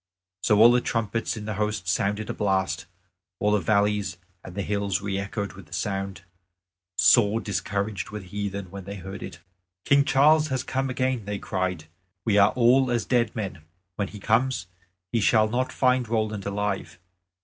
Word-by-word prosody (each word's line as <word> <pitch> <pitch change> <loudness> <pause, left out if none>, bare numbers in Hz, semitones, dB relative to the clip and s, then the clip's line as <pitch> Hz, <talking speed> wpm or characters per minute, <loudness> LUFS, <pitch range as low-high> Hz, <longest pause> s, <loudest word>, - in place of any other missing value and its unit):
So 105 - +3
all 115 +3 +8
the 125 0 +3
trumpets 115 0 -2
in 105 - -6
the 110 - -3
host 105 -3 -2
sounded 105 +3 0
a - - -4
blast; 95 -4 0 0.5
all 105 - +1
the 105 - +3
valleys 100 0 +1 0.3
and 95 +1 -10
hills 100 -1 -1
re 100 -1 -2
echoed 100 +1 -4
with - - -13
the - - -13
sound; 95 -3 -3 0.7
sore 110 -2 +5
discouraged 100 -2 -3
were 105 - -6
the - - -13
heathen 100 -1 -5
when 100 -1 -8
they 100 +1 -6
heard 95 0 -8
it. 85 - -8 0.4
"King 140 0 +5
Charles 150 +2 +4
has 130 -3 -2
come 135 +1 -2
again," 130 -3 -1
they 105 0 -3
cried; 95 -4 -2 0.4
"we 105 -2 +4
are 100 +1 +6
all 125 +2 +4
as 120 -2 0
dead 120 -3 +1
men. 95 -7 -4 0.3
When 100 0 -1
he 105 - -10
comes 115 +1 +1 0.5
he 115 - +1
shall 110 +1 +4
not 125 +4 -1
find 125 -2 +2
Roland 110 -3 -1
alive." 100 -2 -2
105 Hz, 175 wpm, -25 LUFS, 100-115 Hz, 0.7 s, all